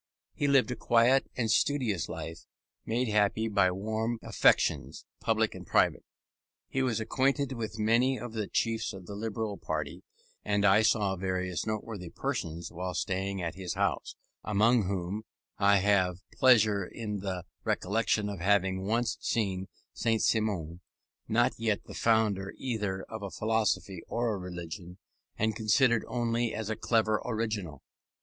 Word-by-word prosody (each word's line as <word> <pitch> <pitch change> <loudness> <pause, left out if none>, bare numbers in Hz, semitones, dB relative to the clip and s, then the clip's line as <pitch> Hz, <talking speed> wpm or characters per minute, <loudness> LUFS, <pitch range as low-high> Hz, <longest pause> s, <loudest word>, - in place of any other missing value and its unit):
He 145 - 0
lived 135 -2 +4
a - - -2
quiet 120 +4 +3
and 115 -3 +1
studious 120 - +1
life, 80 +1 -7 0.4
made 120 +3 0
happy 105 +1 +2
by 100 -4 +3
warm 110 +5 -2
affections, - - +2
public - - +1
and - - -8
private. - - +2 0.6
He 135 - -1
was 125 -4 +1
acquainted 135 +4 +1
with 110 -4 -4
many 120 +5 +3
of 120 0 -7
the 110 -3 -2
chiefs 115 -1 -1
of 95 -2 -9
the 100 - -8
Liberal 110 0 -3
party, 75 -2 -4 0.4
and 100 -1 +1
I 100 +2 +6
saw 105 -3 +2
various 90 -1 -2
noteworthy 110 -4 -4
persons 80 0 -4
while 90 +1 -4
staying 95 +2 -2
at 85 - -3
this 95 -2 -4
house; - - -1 0.3
among 110 +1 +3
whom 95 +2 -2 0.4
I 100 0 +5
have 95 -2 +2
pleasure 110 -6 +5
in 105 +2 -5
the 95 -2 -4 0.2
recollection 105 +1 0
of 100 -3 -5
having 95 0 +1
once 115 +1 0
seen 95 -4 -1 0.3
Saint 115 -1 +1
Simon, 95 -7 0 0.5
not 120 +3 +3
yet 110 -3 0
the - - -11
founder 105 -4 +1
either 105 -7 -2
of 110 -1 -8
a 100 - -4
philosophy 110 -4 0
or 115 -1 0
a - - -3
religion, 90 0 -7 0.4
and 110 0 +1
considered 115 +2 +3
only 120 -1 0
as 110 0 -3
a - - -1
clever 110 -1 +1
original. 110 - -3
105 Hz, 150 wpm, -30 LUFS, 95-115 Hz, 0.6 s, I